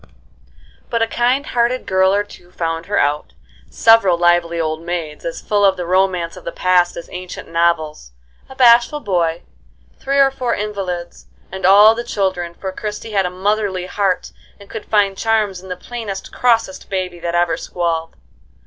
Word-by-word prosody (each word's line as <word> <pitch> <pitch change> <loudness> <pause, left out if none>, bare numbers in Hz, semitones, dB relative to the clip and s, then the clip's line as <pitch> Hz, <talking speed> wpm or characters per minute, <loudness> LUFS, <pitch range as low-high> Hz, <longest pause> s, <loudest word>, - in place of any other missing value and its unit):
But 230 -2 +1
a - - 0
kind 250 +5 +1
hearted 240 0 0
girl 190 0 +3
or 205 +1 +2
two 180 -3 -16
found 165 -1 -3
her 205 - -1
out, 145 +1 0 0.4
several 225 - +4
lively 175 -1 +2
old 155 -1 -2
maids, 165 -3 -5
as 165 - -4
full 205 -1 +1
of 195 -1 +4
the 180 - -4
romance 180 -2 +1
of - - -12
the - - -5
past 180 -1 +2
as 170 - -7
ancient 180 0 -8
novels, 165 - 0 0.4
a 265 - -11
bashful 240 +3 +5
boy, 170 - -1 0.6
three 275 +1 -1
or 275 -1 +5
four 255 -3 -2
invalids, 195 -4 -5 0.2
and 190 -1 -1
all 205 +3 +8
the 235 +1 -4
children, 185 -6 -2
for 190 +1 -5
Christie 210 +3 -6
had 195 -3 +1
a - - -3
motherly 190 0 -1
heart 190 -1 -1 0.3
and 200 - -14
could 220 - -7
find 200 -2 +2
charms 215 -5 0
in 190 - -12
the 180 - -4
plainest, 205 -2 -7
crossest 230 -6 0
baby 185 -2 -3
that 170 0 -3
ever 175 -1 +2
squalled. 165 -1 -3
190 Hz, 175 wpm, -18 LUFS, 175-215 Hz, 0.6 s, all